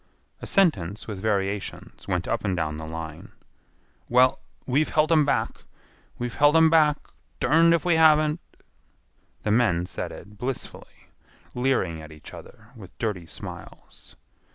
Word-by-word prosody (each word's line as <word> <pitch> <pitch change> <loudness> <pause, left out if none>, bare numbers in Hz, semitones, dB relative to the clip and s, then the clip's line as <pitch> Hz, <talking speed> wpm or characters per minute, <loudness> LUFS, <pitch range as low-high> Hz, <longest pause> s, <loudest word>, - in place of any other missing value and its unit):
A - - -7
sentence 100 - +1
with 105 -4 -5
variations 100 -1 -3
went - - -1
up - - -1
and 95 -2 -1
down 75 -2 -2
the 80 0 -7
line. 80 -1 -8 0.8
"Well, 125 +1 +4 0.3
we've 140 +4 +1
helt 155 +1 +2
'em 155 -3 +5
back. 140 - -1 0.5
We've 120 -1 -4
helt 145 +2 +4
'em 160 -1 +6
back; 150 -2 +4 0.4
derned 165 +2 +5
if 170 - -3
we 175 -2 +3
haven't." 155 0 +4 1.0
The 105 - 0
men 105 -7 +2
said - - -5
it 105 -1 -12
blissfully, 130 0 -7 0.4
leering 125 -11 0
at 80 0 -11
each 75 -1 -13
other 110 +2 -13
with 95 -6 -13
dirty 100 -7 -3
smiles. - - -11
115 Hz, 145 wpm, -25 LUFS, 95-150 Hz, 1.0 s, em